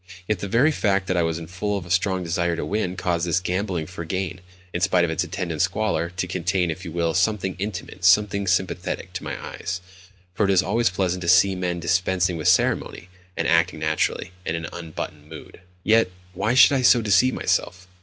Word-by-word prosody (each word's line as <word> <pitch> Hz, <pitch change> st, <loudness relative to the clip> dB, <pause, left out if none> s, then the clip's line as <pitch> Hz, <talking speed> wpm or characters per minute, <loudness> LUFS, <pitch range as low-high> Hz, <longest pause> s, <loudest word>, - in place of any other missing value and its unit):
Yet 105 Hz, -4 st, 0 dB
the 100 Hz, -, -4 dB
very 125 Hz, +10 st, +3 dB
fact 100 Hz, -8 st, +1 dB
that 95 Hz, -, -1 dB
I 85 Hz, -, +2 dB
was 80 Hz, 0 st, -1 dB
full 95 Hz, +5 st, -3 dB
of 95 Hz, -, -6 dB
a 85 Hz, -, -9 dB
strong 95 Hz, 0 st, +1 dB
desire 85 Hz, 0 st, 0 dB
to -, -, -3 dB
win 100 Hz, -3 st, -2 dB
caused 90 Hz, -2 st, -1 dB
this 85 Hz, +1 st, +2 dB
gambling 90 Hz, -2 st, -2 dB
for 90 Hz, 0 st, -7 dB
gain, 95 Hz, +2 st, -3 dB, 0.3 s
in 90 Hz, -, -2 dB
spite 90 Hz, -1 st, +3 dB
of 80 Hz, -, -2 dB
its 80 Hz, -, 0 dB
attendant 85 Hz, -4 st, -3 dB
squalor, 95 Hz, -3 st, 0 dB
to 90 Hz, +1 st, -3 dB
contain, 90 Hz, -1 st, -1 dB
if 90 Hz, +4 st, -7 dB
you 85 Hz, -, -6 dB
will, 85 Hz, 0 st, 0 dB
something 95 Hz, +1 st, 0 dB
intimate, 100 Hz, -3 st, -5 dB
something 100 Hz, +2 st, +4 dB
sympathetic, 90 Hz, -1 st, -1 dB
to -, -, -5 dB
my -, -, -5 dB
eyes: 90 Hz, +1 st, -5 dB, 0.5 s
for 105 Hz, -, +1 dB
it 100 Hz, -, +2 dB
is 95 Hz, -1 st, +4 dB
always 115 Hz, +2 st, +1 dB
pleasant 90 Hz, -1 st, -1 dB
to 85 Hz, -, -5 dB
see 95 Hz, +2 st, +5 dB
men 90 Hz, -2 st, -2 dB
dispensing 90 Hz, +2 st, +1 dB
with 80 Hz, -, -2 dB
ceremony, 90 Hz, -, +1 dB, 0.3 s
and -, -, 0 dB
acting 85 Hz, +1 st, +2 dB
naturally, 80 Hz, +3 st, -1 dB
and 85 Hz, -, -2 dB
in 85 Hz, -, -5 dB
an -, -, -8 dB
unbuttoned 80 Hz, -2 st, -7 dB
mood.... 80 Hz, +2 st, -11 dB, 0.2 s
Yet 115 Hz, -2 st, +4 dB, 0.2 s
why 105 Hz, +6 st, 0 dB
should 130 Hz, -, +8 dB
I -, -, 0 dB
so 120 Hz, -1 st, +5 dB
deceive 105 Hz, +5 st, +3 dB
myself? 90 Hz, 0 st, -1 dB
90 Hz, 210 wpm, -23 LUFS, 85-95 Hz, 0.5 s, should